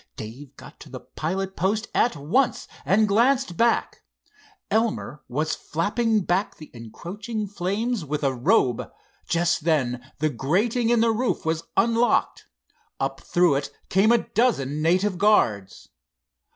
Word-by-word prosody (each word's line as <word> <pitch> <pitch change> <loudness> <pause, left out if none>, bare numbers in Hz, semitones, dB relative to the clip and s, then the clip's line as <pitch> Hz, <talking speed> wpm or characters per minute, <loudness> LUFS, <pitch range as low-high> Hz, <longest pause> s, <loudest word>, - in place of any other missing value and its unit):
Dave 130 +6 -9
got - - -14
to - - -12
the - - -8
pilot 190 +4 -4
post 210 +5 0
at 240 - +2
once, 170 - 0 0.2
and 210 +3 +3
glanced 235 0 +2
back. 235 +5 +1 0.7
Elmer 220 -9 -1
was 150 +6 -1
flapping 215 +7 0
back 185 +3 -1
the 155 - -12
encroaching 205 - -6
flames 205 +3 -2
with 150 0 -4
a 135 -1 +2
robe. 130 - +1 0.4
Just 170 -1 +1
then 130 -5 -1
the 155 +1 0
grating 210 - 0
in 235 -1 +3
the 230 0 +3
roof 235 -3 -1
was 160 0 -1
unlocked. 230 0 +2 0.5
Up 135 0 -3
through 175 -3 +2
it 140 0 -2 0.2
came 200 +4 +4
a 235 - +2
dozen 155 - +1
native 180 +3 +1
guards. 110 - +1
185 Hz, 140 wpm, -24 LUFS, 145-225 Hz, 0.7 s, came